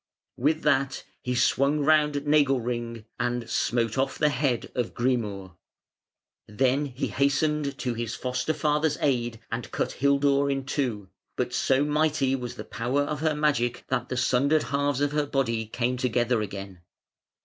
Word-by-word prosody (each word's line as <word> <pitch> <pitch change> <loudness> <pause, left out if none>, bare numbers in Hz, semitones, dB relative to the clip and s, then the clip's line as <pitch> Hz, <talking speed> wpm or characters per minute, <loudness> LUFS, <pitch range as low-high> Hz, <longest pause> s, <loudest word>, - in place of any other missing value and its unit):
With 155 +5 +1
that 140 -2 +1 0.2
he 125 0 -2
swung 140 +4 +2
round 150 -1 +3
Nagelring 125 -6 +1
and 120 -1 -1
smote 115 +1 0
off 135 0 0
the 150 - +3
head 140 -5 -1
of 125 -2 -2
Grimur. 105 -7 -1 0.9
Then 130 +6 +1
he 130 -1 -3
hastened 140 +1 +1
to 125 -2 -2
his 115 -1 -4
foster 130 +5 -2
father's 150 +1 +1
aid 120 -5 0
and 115 +1 -4
cut - - -1
Hildur 140 0 +2
in 135 -1 -1
two, 120 -9 -2 0.3
but - - -2
so 135 +2 +2
mighty 150 -3 +1
was 125 -2 -5
the - - -7
power 125 +5 -1
of 150 0 -3
her 155 -1 +1
magic 140 -6 0
that 125 +1 -1
the 130 - -3
sundered 135 +4 +2
halves 140 -1 0
of 145 0 +1
her 150 -1 0
body 115 -5 0
came 125 +3 -1
together 120 -2 +1
again. 100 -3 -7
135 Hz, 155 wpm, -26 LUFS, 120-145 Hz, 0.9 s, round